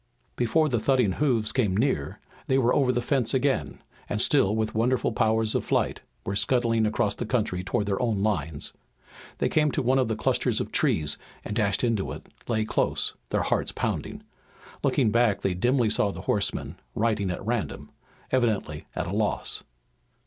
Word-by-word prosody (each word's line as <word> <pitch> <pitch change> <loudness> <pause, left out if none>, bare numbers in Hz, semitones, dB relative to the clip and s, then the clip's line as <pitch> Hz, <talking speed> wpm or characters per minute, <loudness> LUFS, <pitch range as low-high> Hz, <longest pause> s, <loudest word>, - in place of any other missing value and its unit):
Before 155 +7 +2
the 120 -5 0
thudding 125 -3 +2
hoofs 115 -2 +1
came 105 -6 +1
near 110 - 0 0.3
they 130 - +3
were 125 -2 +3
over 130 -3 +3
the 120 -1 -1
fence 130 -1 +1
again, 125 - 0 0.3
and, 105 - -1
still 110 -4 +4
with 110 0 -1
wonderful 120 +3 +1
powers 110 0 +1
of - - 0
flight, - - 0 0.2
were 100 - -2
scudding 115 0 +2
across 105 -1 +1
the - - -4
country 110 -6 -1
toward 105 +3 -1
their 100 +2 -1
own 110 -5 0
lines. 80 -8 -2 0.6
They - - +1
came 150 -1 +2
to 145 - 0
one 130 +2 +3
of 130 - +2
the 110 - -1
clusters 110 - 0
of - - -3
trees 75 -1 +1 0.3
and 105 - -4
dashing 105 +2 +1
into 105 -4 -2
it - - -10 0.2
lay 110 -2 0
close, - - 0 0.2
their - - +1
hearts - - 0
pounding. - - -3 0.6
Looking 110 - +2
back 115 -4 +2
they 95 - 0
dimly 120 +4 +2
saw 105 - +2
the - - -6
horsemen, - - 0 0.2
riding 105 -3 +1
at 90 - -4
random, 120 -1 -3 0.4
evidently 110 -12 0
at - - -2
a 85 - -4
loss. 105 -1 -1
110 Hz, 180 wpm, -26 LUFS, 100-125 Hz, 0.6 s, still